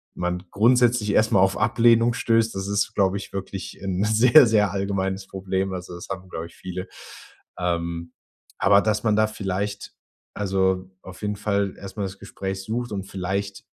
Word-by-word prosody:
man 90 0 -2
grundsätzlich 120 0 +3
erstmal 105 -3 +4
auf 95 0 +1
Ablehnung 115 0 +4
stößt, 115 -1 +1
das 95 0 -3
ist, 100 0 0
glaube 95 0 +2
ich, 100 - -9
wirklich 95 0 -6
'n 95 0 -1
sehr, 120 +6 +7
sehr 105 -2 +3
allgemeines 95 -1 -2
Problem, 95 0 -2
also, 90 -1 -6
das 85 - -9
haben, 95 -1 -6
glaube 80 -2 -5
ich 85 - -19
viele. 90 0 -6 0.7
Ähm, 85 -1 -2 0.5
aber 100 0 +5
dass 110 0 0
man 110 -2 +2
da 110 0 +3
vielleicht 100 -1 -4 0.4
also, 95 -2 0
auf 95 -1 -11
jeden 105 0 -1
Fall 100 -1 -1
erstmal 100 +1 -5
das 95 0 -8
Gespräch 95 0 -5
sucht 120 +3 -3
und 95 -1 -4
vielleicht 95 +1 -4
100 Hz, 165 wpm, -24 LUFS, 95-105 Hz, 0.7 s, sehr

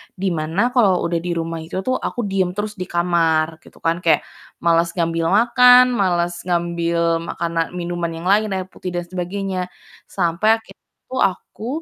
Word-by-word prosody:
di 190 0 -1
mana 170 +9 0
kalau 205 -8 +3
udah 170 0 0
di 175 +1 -4
rumah 165 0 -3
itu 160 +3 -5
tuh 255 +3 0
aku 240 - -3
diem 190 -2 0
terus 210 +1 -3
di 180 - -4
kamar, 165 -2 +1
gitu - - -18
kan, 165 +1 +1
kayak 170 -2 +2 0.4
males 170 0 +3
ngambil 165 -1 0
makan, 250 +2 +7
males 175 -4 +1
ngambil 170 -1 0
makana 165 -1 -2
minuman 175 -1 -3
yang - - -3
lain, 210 +2 +3
air 185 -1 -4
putih 180 - -6
dan 175 - -1
sebagainya 185 +1 -3 0.4
sampai 190 +5 +2
akhirnya 225 - -19 0.3
tuh 260 - -2
aku 195 +4 -3
175 Hz, 170 wpm, -20 LUFS, 170-195 Hz, 0.4 s, makan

